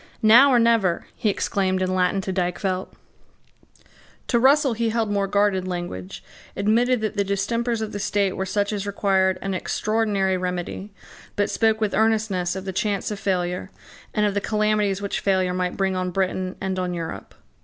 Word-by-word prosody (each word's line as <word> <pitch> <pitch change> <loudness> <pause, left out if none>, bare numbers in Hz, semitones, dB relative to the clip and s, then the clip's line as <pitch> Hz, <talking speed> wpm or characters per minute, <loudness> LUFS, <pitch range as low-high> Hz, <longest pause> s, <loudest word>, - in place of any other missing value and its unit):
"Now 235 +6 +8
or 255 - +4
never," 230 -7 +2
he 215 - 0
exclaimed 190 -1 0
in 185 0 0
Latin 185 +1 +1
to 190 0 -4
Dykvelt. 185 +1 -1 1.4
To 235 - +3
Russell 275 +1 +4
he 230 0 0
held 220 -2 -1
more 200 -1 0
guarded 200 -2 +1
language, 175 - -5 0.3
admitted 230 +4 +2
that 215 -1 -3
the 200 - +3
distempers 230 +4 -1
of 215 -1 -3
the 205 - -5
state 200 -2 0
were 190 - -3
such 205 +2 0
as 205 -1 -3
required 190 -2 +1
an 195 0 -2
extraordinary 200 -1 0
remedy, 180 +2 -4 0.4
but 205 - 0
spoke 220 -1 +2
with 215 -2 -1
earnestness 215 -5 +1
of 190 0 -6
the 190 - -4
chance 200 +2 -1
of 205 - -4
failure, 180 -1 -2 0.4
and 210 - +1
of 205 - 0
the 205 - -1
calamities 210 -2 0
which 200 - -2
failure 185 -2 +1
might 180 0 -2
bring 190 -1 0
on 185 0 -1
Britain 185 0 -2
and 190 -1 -2
on 180 -1 -2
Europe. 165 -1 -6
195 Hz, 175 wpm, -23 LUFS, 185-215 Hz, 1.4 s, Now